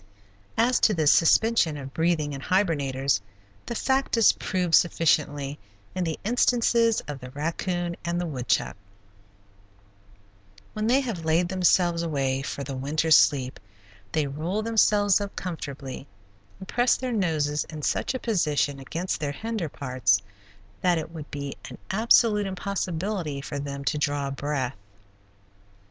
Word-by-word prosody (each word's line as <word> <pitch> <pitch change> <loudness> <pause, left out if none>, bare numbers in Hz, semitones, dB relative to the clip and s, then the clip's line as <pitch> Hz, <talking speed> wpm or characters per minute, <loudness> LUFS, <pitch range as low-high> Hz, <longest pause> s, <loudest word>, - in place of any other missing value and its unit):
As 235 +2 +3
to 215 - +3
the 160 -2 0
suspension 165 +1 +4
of 135 -1 -8
breathing 160 -3 0
in 135 - -6
hibernators, 140 - +1 0.5
the 235 - -3
fact 265 0 +1
is 225 - +6
proved 180 -4 -2
sufficiently 150 -4 +2 0.3
in 185 - -1
the 160 -2 -3
instances 235 0 +2
of 145 -2 -6
the 125 -1 -9
raccoon 170 +5 -3
and 170 0 -1
the 175 - -2
woodchuck. 130 -7 -1 2.0
When 215 0 -2
they 260 +4 +4
have 225 -11 -4
laid 165 +2 +2
themselves 180 -2 +2
away 135 -5 -1
for 140 +1 -5
the 135 0 -5
winter 150 +5 -1
sleep 130 -4 +4 0.5
they 155 +4 +1
roll 160 +10 -3
themselves 210 -3 +3
up 200 -1 -5
comfortably 140 -6 -6 0.5
and 190 - -10
press 245 +1 +2
their 255 -1 -3
noses 155 -7 0
in 155 -2 -9
such 265 - 0
a - - -2
position 150 - 0
against 165 +7 -3
their 145 -3 -2
hinder 220 -3 -4
parts 125 -8 +1 0.6
that 180 -2 +3
it 160 0 -5
would 155 -3 -8
be 140 -1 -5
an - - -10
absolute 215 0 +4
impossibility 185 -4 -3
for 140 +1 -5
them 140 0 -5
to 145 +4 0
draw 145 -1 -1
a - - -5
breath. 135 -3 -3
165 Hz, 145 wpm, -26 LUFS, 140-200 Hz, 2.0 s, is